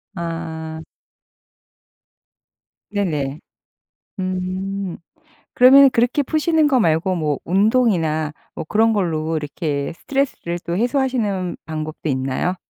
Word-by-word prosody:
아. 160 -2 -5 2.1
네네. 155 -8 -2 0.8
음. 185 0 -3 0.6
그러면은 270 +2 +8
그렇게 245 +3 +2
푸시는 310 +2 +2
거 265 -3 +3
말고 170 -1 +2
뭐 150 -4 -1
운동이나 180 -6 +2 0.2
뭐 - - -5
그런 225 +4 +3
걸로 165 -5 -1
이렇게 150 -1 -3
스트레스를 255 -6 -2
또 170 +1 -3
해소하시는 230 -7 0
방법도 155 0 -5
있나요? 135 +7 -1
180 Hz, 220 characters per minute, -20 LUFS, 160-225 Hz, 2.1 s, 그러면은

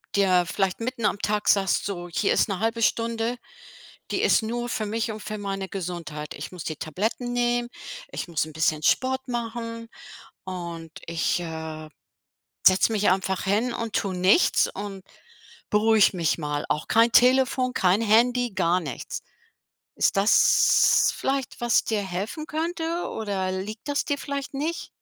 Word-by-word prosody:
dir 185 -3 +3
vielleicht 195 -1 0
mitten 235 -1 -3
am 200 - +1
Tag 210 0 -1
sagst 195 -2 +2
so: 175 -3 -5
„Hier 195 +4 +1
ist - - +2
'ne 195 -2 -2
0.5 225 +2 -1
Stunde. 230 +1 0 0.7
Die - - 0
ist - - +3
nur 240 +2 -3
für 220 - -2
mich 225 +2 -2
und 215 - -7
für 215 +1 -5
meine 195 -1 -4
Gesundheit. 170 -5 -5
Ich 145 - -7
muss 180 -3 -8
die 155 - -3
Tabletten 220 - -3
nehmen, 240 0 +1 0.4
ich - - -5
muss 165 -3 -1
'n 155 - -11
bisschen 155 0 0
Sport 260 - +1
machen 230 -1 -5 0.6
und 170 -3 -6 0.2
ich, 165 +1 0
äh, 160 -2 -6 0.8
setze 190 +4 +5
mich 210 -1 +2
einfach 190 0 0
hin 215 +5 +1
und 230 -2 -4
tue 195 -2 -1
nichts 185 - +4
und 195 -1 -7 0.7
beruhige 215 -1 +4
mich 165 -1 +1
mal. 150 -2 -3
Auch 150 - -1
kein 230 +1 +4
Telefon, 255 +1 +4
kein 190 0 +2
Handy, 240 +2 +3
gar 180 -1 +2
nichts.” 140 -6 -6 0.7
Ist - - +2
das 200 +3 +5
vielleicht, 270 -2 -2
was 240 0 +3
dir 215 -2 -1
helfen 200 - -5
könnte, 330 +2 -2
oder 195 -4 -2
liegt 210 +7 -6
das 285 - 0
dir 285 - -1
vielleicht 280 0 -5
nicht? 315 +5 -3
210 Hz, 160 wpm, -25 LUFS, 180-240 Hz, 0.8 s, setze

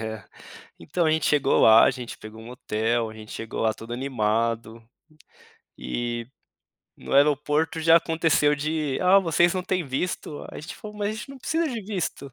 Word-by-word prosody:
É, 110 -3 -6 0.6
então 165 - -1
a 155 - +3
gente 160 -1 +1
chegou 145 -2 +3
lá, 110 0 +7
a - - +5
gente 125 -2 -8
pegou 110 +1 -11
um 115 - -11
hotel, 115 -1 -1
a - - -10
gente 110 -1 -12
chegou 115 0 -5
lá 110 -1 +2
todo 115 +2 -8
animado, 115 -2 -1 1.0
e 120 - -4 0.7
no - - -9
aeroporto 150 +3 +2
já 165 +1 +6
aconteceu 160 -3 +2
de: 150 -1 -2
"Ah, 185 +2 +6
vocês 175 -1 +2
não 185 - -1
têm 185 -2 -1
visto", 145 +2 -4
a - - -9
gente 155 - -8
falou: 210 -1 -10
"Mas 205 0 -1
a - - -3
gente 220 +5 -8
não 275 - -10
precisa 325 +5 -1
de 240 -4 -4
visto". 180 -9 -4
145 Hz, 185 wpm, -25 LUFS, 115-170 Hz, 1.0 s, lá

